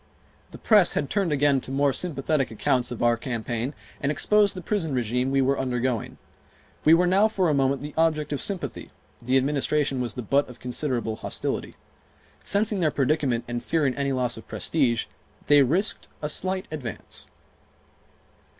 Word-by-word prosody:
The - - -11
press 205 -5 +4
had 145 - -2
turned 195 -5 0
again 140 -2 +2
to - - -10
more 140 +1 +1
sympathetic 145 -4 -1
accounts 120 +3 0
of 120 - -4
our 120 0 +4
campaign 120 +2 -3 0.3
and 140 - 0
exposed 205 +6 +3
the 185 - -6
prison 165 -8 -1
regime 125 +2 0
we 135 0 +2
were 135 +1 +1
undergoing. 125 -2 -2 0.7
We 160 +2 +7
were 180 +2 +3
now 195 +4 +4
for 190 -5 0
a - - +2
moment 135 0 +1
the 150 - -7
object 155 -2 +1
of 140 - -2
sympathy; 195 -3 -4 0.3
the 125 +3 +2
Administration 140 0 0
was 120 -4 -3
the 125 - -5
butt 140 +6 +1
of 125 - -12
considerable 125 -3 -2
hostility. - - -4 0.7
Sensing 205 0 +2
their 160 -3 +2
predicament 140 -4 0
and 120 0 -4
fearing 145 -6 0
any 140 -1 -1
loss 125 -3 -1
of 110 - -12
prestige, 125 -8 0 0.4
they 145 -1 +6
risked 170 - +2 0.2
a 150 - -1
slight 185 +4 -1
advance. 135 -8 -6
140 Hz, 170 wpm, -25 LUFS, 125-160 Hz, 0.7 s, We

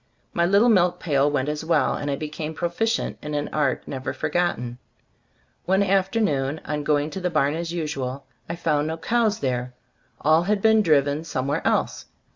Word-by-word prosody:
My 170 0 +2
little 200 +6 +4
milk 180 -4 +3
pail 145 -3 +2
went 145 -2 -1
as 150 +1 -3
well, 160 -4 +2
and 145 - -3
I 140 - 0
became 155 +2 -5
proficient 200 +7 -1
in 150 0 -4
an 145 0 -2
art 140 -4 0
never 130 -1 -4
for 130 - -3
gotten. 125 -9 -1 0.9
One 190 +2 +3
afternoon, 190 -7 +1
on 150 0 -2
going 150 +1 +1
to 190 - -5
the 180 - 0
barn 150 -3 +1
as 165 +1 -3
usual, 140 -5 -4 0.2
I 170 - -2
found 155 -3 0
no 160 +1 -3
cows 220 +4 +1
there; 125 -1 -2 0.4
all 155 +3 +4
had 205 +4 +1
been 220 +1 +4
driven 145 -3 +2
somewhere 140 -2 -2
else. - - 0
155 Hz, 180 wpm, -24 LUFS, 145-180 Hz, 0.9 s, little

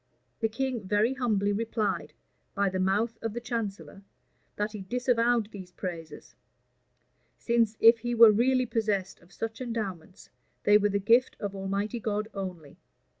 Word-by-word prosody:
The 225 - +1
king 240 -3 -3
very 210 +5 +2
humbly 210 -6 0
replied, 215 -1 -2 0.4
by 200 -1 +2
the 185 0 -3
mouth 205 +5 0
cf 225 -2 -3
the 240 - -3
chancellor, 225 -5 -5 0.5
that 210 +1 -2
he 210 -2 -7
disavowed 240 0 +1
these 185 -3 -10
praises; 165 -4 -7 1.0
since, 230 -2 +1
if 230 +1 +7
he 240 +1 -2
were 230 -1 +9
really 255 +4 +2
possessed 210 -5 -1
of 175 - -22
such 225 +2 -5
endowments, 200 -7 -5 0.3
they 205 0 +6
were 205 0 +2
the 200 - 0
gift 230 +5 +3
of 200 -2 -4
Almighty 200 +4 -2
God 215 0 -2
only. 180 -7 -7
215 Hz, 150 wpm, -28 LUFS, 195-230 Hz, 1.0 s, were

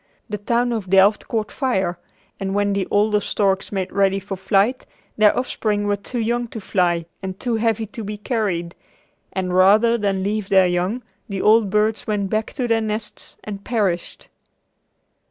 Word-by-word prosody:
The 210 - -3
town 240 +3 +1
of 210 -5 -4
Delft 195 +2 +4
caught 220 -2 -2
fire 190 -10 -1 0.4
and 195 0 -2
when 205 0 +1
the 195 -2 -1
older 210 0 +2
storks 195 -2 0
made 190 -2 -2
ready 195 0 +2
for 195 0 -6
flight 200 +6 +1 0.3
their 215 -1 +4
offspring 215 -4 -1
were 205 0 +1
too 200 +5 -7
young 240 +1 0
to 225 - -7
fly 175 -4 0 0.2
and 190 0 -6
too 240 -3 -1
heavy 225 -1 0
to 225 +1 -8
be 210 +1 -5
carried, 205 -7 -2 0.6
and 185 -1 -2
rather 215 +6 +5
than 195 -2 0
leave 205 0 -2
their 190 -1 +5
young, 180 +7 -1 0.3
the 195 -1 -3
old 215 -1 +5
birds 210 +2 +1
went 205 -2 -1
back 215 0 -1
to 255 -3 -2
their 225 -1 +2
nests 215 0 -5
and 200 -2 -7
perished. 200 -7 -2
205 Hz, 170 wpm, -21 LUFS, 190-220 Hz, 0.6 s, rather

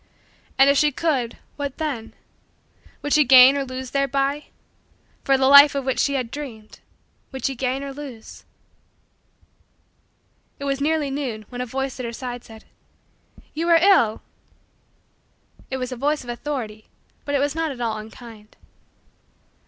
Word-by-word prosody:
And 270 +1 +6
if 280 0 +4
she 300 0 +3
could 265 -6 -1 0.2
what 285 -2 -4
then 280 -8 -4 0.9
would 290 - -1
she 305 - +6
gain 260 +1 +8
or 280 - -1
lose 255 -1 -7
thereby? 275 +1 0 0.8
For 270 -1 +3
the 265 - +2
life 280 +1 +8
of 275 -2 -2
which 265 - -1
she 280 - +1
had 250 -3 -3
dreamed, 235 -8 -9 0.5
would 265 -1 -6
she 270 - 0
gain 265 +1 -2
or 275 -1 -6
lose? 265 -6 -10 2.1
It - - -9
was 275 0 -2
nearly 300 -1 0
noon 250 -6 -4
when 245 0 -6
a 250 - -4
voice 270 +2 -4
at 250 - -4
her 235 - -6
side 245 0 -6
said: 220 -1 -14 0.9
"You 330 +3 -2
are 335 - +7
ill!" 330 - +3 1.5
It 265 - -3
was 255 0 -4
a - - -4
voice 290 +3 -1
of 240 - -6
authority 235 -5 -5 0.4
but 285 - -2
it - - +2
was 285 +1 0
not 325 0 -1
at 260 - -9
all 230 -3 -2
unkind. 220 -1 -13
270 Hz, 160 wpm, -22 LUFS, 245-285 Hz, 2.1 s, gain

